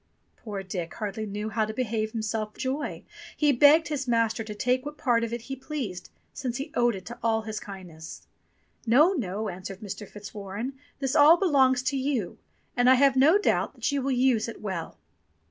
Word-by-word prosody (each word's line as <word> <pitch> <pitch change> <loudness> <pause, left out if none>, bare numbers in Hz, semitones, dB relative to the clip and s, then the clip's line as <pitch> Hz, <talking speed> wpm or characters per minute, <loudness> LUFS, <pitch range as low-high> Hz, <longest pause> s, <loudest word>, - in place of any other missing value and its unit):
Poor 205 -3 -6
Dick 180 -3 -5
hardly 215 +1 -4
knew 210 +2 -4
how 220 +1 0
to 215 0 -4
behave 220 -3 -1
himself 215 -1 -3
for - - -19
joy. 270 +3 -3 0.3
He 295 -1 +4
begged 295 +5 +6
his 280 -3 -2
master 230 -1 +1
to 215 -1 -7
take 250 +4 +1
what 295 +1 -7
part 235 -2 +2
of 230 - -3
it 235 0 -3
he 270 +4 -6
pleased, 260 - -5 0.2
since 245 -3 -3
he 285 +3 -5
owed 240 -5 +2
it 190 +4 -8
all 225 -1 +1
to - - -16
his 220 -1 -4
kindness. 180 -5 -10 0.6
"No, 295 - +5
no," 215 - -3
answered 190 +1 -7
Mr. 205 0 -7
Fitzwarren, 205 +4 -6 0.2
"this 270 -2 -2
all 305 +3 +8
belongs 265 -8 +3
to 275 +1 0
you; 260 -8 -2 0.4
and 245 +1 +4
I 260 - +8
have 270 +1 +4
no 295 +8 +6
doubt 415 - 0
that - - -1
you 285 -1 0
will 270 - -1
use 250 -3 +2
it 230 - -7
well." 185 -6 -5
230 Hz, 195 wpm, -27 LUFS, 210-270 Hz, 0.6 s, all